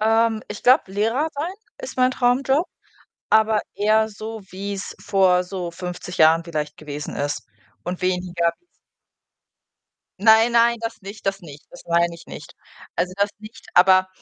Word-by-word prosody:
Ähm, 225 0 +2
ich 210 - -7
glaube, 250 -6 +4
Lehrer 225 +10 0
sein 320 +6 -3 0.3
ist - - -8
mein 255 0 +4
Traumjob, 265 +6 +2 0.6
aber 220 -1 +4
eher 220 +1 +2
so, 220 +1 -7
wie's 200 +1 -5
vor 185 -2 +3
so 180 -2 -5
50 180 +1 -7
Jahren 160 +1 +5
vielleicht 150 -3 -4
gewesen 150 -1 -7
ist 145 +1 -3 0.4
und 180 +1 -5
weniger 180 -2 0
wie's 355 - -41 1.6
Nein, 225 +1 +6
nein, 235 0 +4
das 225 0 -5
nicht, 200 +1 -10
das 195 0 -1
nicht, 150 -3 -12
das - - -13
meine 170 0 +2
ich 170 - -14
nicht. - - -10 0.4
Also, 180 0 -1
das 200 0 +1
nicht, 220 +4 -13
aber 185 +1 +6
200 Hz, 150 wpm, -22 LUFS, 180-225 Hz, 1.6 s, Nein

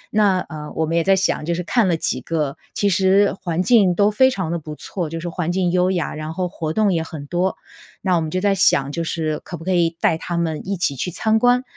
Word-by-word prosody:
那， 200 -3 +4
呃， 150 -1 -8
我 160 - +1
们 165 - -2
也 170 - +2
在 195 +3 +4
想 190 -4 0
就 170 +2 -1
是 180 - -3
看 220 +2 +2
了 170 -2 +1
几 130 -4 -1
个 150 -3 -2 0.2
其 205 - +1
实 195 +2 +3
环 175 -1 -1
境 200 -6 +4
都 205 +3 +3
非 260 +5 +4
常 190 -10 -3
地 170 - -1
不 155 0 -8
错， 170 0 -5
就 165 - -5
是 170 - -5
环 175 0 -2
境 180 -1 0
优 180 0 +2
雅， 180 -3 -1
然 155 +1 -5
后 185 -1 -1
活 160 -3 -4
动 210 +1 +2
也 165 - 0
很 160 -3 -7
多。 180 +5 -1 0.5
那 185 -2 +1
我 165 - +1
们 160 - -3
就 185 - -1
在 200 +1 +2
想 140 -7 +3
就 170 +3 -3
是 155 -2 -2
可 175 - -7
不 165 - -11
可 185 - -2
以 170 -1 +2
带 - - +2
他 175 0 -4
们 160 -2 -1
一 200 0 -2
起 165 -5 0
去 160 +7 -3
参 220 +5 +1
观。 245 +2 +3
175 Hz, 285 characters per minute, -21 LUFS, 160-190 Hz, 0.5 s, 那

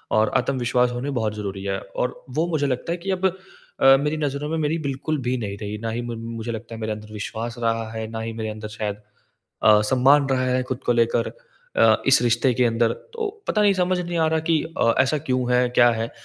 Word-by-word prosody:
और 110 0 +3
आत्मविश्वास 125 -2 +1
होनी 125 +4 -3
बहुत 110 -5 -1
ज़रूरी 100 -2 -5
है 95 -1 -2 0.2
और 125 - -2
वो 165 - +2
मुझे 155 -4 0
लगता 130 +5 -2
है - - -3
कि 185 +3 -4
अब 190 0 -1 0.6
अ, 135 0 +8
मेरी 150 +2 -1
नज़रों 145 -1 -2
में 160 - -1
मेरी 155 +1 0
बिल्कुल 145 +2 -2
भी 125 +1 -1
नहीं 100 -3 -4
रही। 105 0 -5
ना 115 - -1
ही 120 +1 -3
म 120 -1 -5 0.2
मुझे 115 +1 -4
लगता 115 +1 -7
है 115 - -8
मेरे 110 0 -1
अंदर 105 0 -10
विश्वास 110 +2 -5
रहा 115 -1 -1
है, 110 -1 -4
ना 115 - -4
ही 115 0 -4
मेरे 110 -1 -4
अंदर 110 0 -6
शायद 105 -2 -4 0.7
अ, 105 -1 +6
सम्मान 135 +5 +4
रहा 130 -1 +1
है 130 0 +1
खुद 130 0 -4
को - - +3
लेकर 115 0 +2 0.5
अ, - - +6
इस 135 -2 +6
रिश्ते 120 +2 +2
के 125 +1 +2
अंदर। 115 0 +2 0.2
तो 450 -3 -2 0.2
पता 210 - +2
नहीं, 200 -1 +5
समझ 180 0 +1
नहीं 175 -1 -3
आ 160 - +3
रहा 160 0 +1
कि 160 - +3 0.2
अ, 115 - +4
ऐसा 145 +3 +1
क्यों 125 -1 +1
है? 125 0 +4
क्या 120 0 +5
है? 115 0 -3
120 Hz, 235 wpm, -23 LUFS, 110-140 Hz, 0.7 s, अ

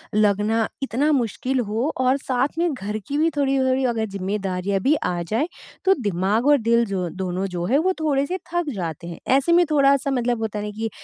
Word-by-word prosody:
लगना 215 +2 +2 0.2
इतना 275 +4 +1
मुश्किल 255 0 0
हो 235 +8 0
और 260 +2 +3
साथ 270 +2 -1
में 340 -2 +1
घर 210 -3 -4
की 285 - -2
भी 320 +2 +3
थोड़ी-थोड़ी 265 -1 +2
अगर 220 -1 -1
ज़िम्मेदारियाँ 195 0 -2
भी 280 +9 +3
आ 175 -1 -1
जाएँ, 235 - 0 0.4
तो 385 - +6
दिमाग 205 +3 0
और 290 - +6
दिल, 235 -1 +2
जो 190 -3 -2 0.2
दोनों 185 +1 -2
जो 175 -1 -2
हैं, 250 +9 +2
वो 370 +5 +2
थोड़े 285 -3 +1
से 365 +6 -3 0.2
थक 345 -3 0
जाते 170 -3 -5
हैं। 170 - -8 0.2
ऐसे 275 +5 +1
में 350 +1 +5
थोड़ा-सा 275 -1 +3
मतलब 245 -2 0
होता 215 -1 -2
है 205 - -4
ना 210 - -4
कि 225 +1 -3
235 Hz, 205 wpm, -22 LUFS, 200-280 Hz, 0.4 s, तो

